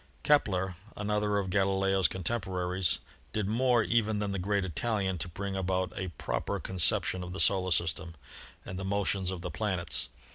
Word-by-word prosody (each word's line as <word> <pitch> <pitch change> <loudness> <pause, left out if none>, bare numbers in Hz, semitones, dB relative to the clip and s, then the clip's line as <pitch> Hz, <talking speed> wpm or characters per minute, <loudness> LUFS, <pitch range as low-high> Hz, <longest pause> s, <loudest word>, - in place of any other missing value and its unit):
Kepler, 95 - +2 0.2
another 105 0 +1
of 95 -2 -1
Galileo's 95 -1 +3
contemporaries, 95 -2 0 0.4
did 105 -3 0
more 120 +1 +3
even 110 -1 +2
than 105 -1 -1
the 100 - -2
great 100 +1 +1
Italian 95 0 -1
to 85 - -4
bring 95 +3 -4
about 95 -1 0
a 95 - -3
proper - - -2
con 95 -1 -6
ception 90 +2 +2
of 90 0 -6
the 95 - -5
solar 95 -2 +4
system 85 0 0 0.5
and 90 - -5
the - - -3
motions 95 -1 0
of 95 -2 -4
the - - -4
planets. 85 - -1
95 Hz, 170 wpm, -30 LUFS, 90-105 Hz, 0.5 s, solar